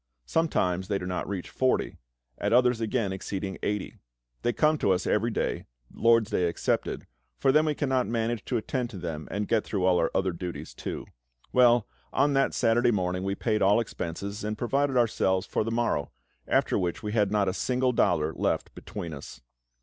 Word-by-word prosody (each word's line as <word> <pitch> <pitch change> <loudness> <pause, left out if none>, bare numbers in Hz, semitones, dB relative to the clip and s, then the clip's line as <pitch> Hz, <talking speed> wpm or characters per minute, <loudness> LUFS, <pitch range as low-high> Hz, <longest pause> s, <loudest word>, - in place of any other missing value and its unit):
Sometimes 95 - 0
they 100 - 0
do 90 - -5
not 90 0 -3
reach 95 -3 -4
forty, 130 -1 0 0.4
at - - 0
others 125 -1 +4
again 110 -3 0
exceeding 95 0 -4
eighty. 105 -1 -3 0.4
They 120 - +1
come 150 +4 +2
to - - +1
us 90 0 -1
every 110 +3 +1
day, 110 - -2 0.3
LORD'S 115 -2 +3
Day 90 - +2
excepted, 85 - -1 0.3
for 135 - +3
then 155 +3 +4
we 150 - +1
cannot 130 -4 +1
manage 115 -1 -1
to 125 - 0
attend 120 +2 -2
to 105 - -8
them 80 -4 -5
and 105 0 -2
get 115 -2 +2
through 95 -4 -1
all 90 -1 +4
our 80 - +2
other 95 -1 +2
duties 85 -3 -6
too. - - -5 0.5
Well, 120 -3 +5 0.3
on 140 +2 +2
that 135 0 +2
Saturday 120 +1 +3
morning 90 -4 0
we 95 0 -1
paid 110 0 0
all 100 +3 +5
expenses, 100 -1 -4
and 105 0 -2
provided 135 +3 +1
ourselves 95 -5 +2
for - - -1
the 110 - -3
morrow, 115 -11 0 0.4
after - - +2
which 90 +2 -2
we 105 - -3
had 105 -3 +2
not 105 -2 +2
a 95 - +1
single 125 +4 +1
dollar 80 -9 +2
left - - -1
between 85 -6 -7
us. 70 -3 -9
105 Hz, 190 wpm, -27 LUFS, 95-120 Hz, 0.5 s, Well